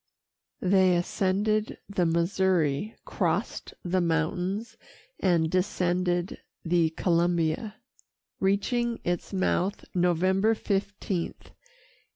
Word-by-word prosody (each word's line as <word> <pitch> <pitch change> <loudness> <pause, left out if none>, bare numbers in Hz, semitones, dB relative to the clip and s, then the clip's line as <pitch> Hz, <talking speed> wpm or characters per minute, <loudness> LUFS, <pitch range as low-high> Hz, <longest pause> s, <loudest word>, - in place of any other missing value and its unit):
They 185 -1 +4
ascended 205 +4 0
the 185 -4 0
Missouri, 170 +1 +1
crossed - - -2
the 185 +1 +1
mountains, 180 +7 -1 0.4
and 170 -4 +2
descended 180 0 0 0.3
the 170 -1 +3
Columbia, 170 +4 0 0.6
reaching 230 +5 0
its 175 0 -2
mouth 190 0 0
November 185 +4 +2
15, 200 -2 0 0.4
1805. - - -9
185 Hz, 85 wpm, -27 LUFS, 170-200 Hz, 0.6 s, They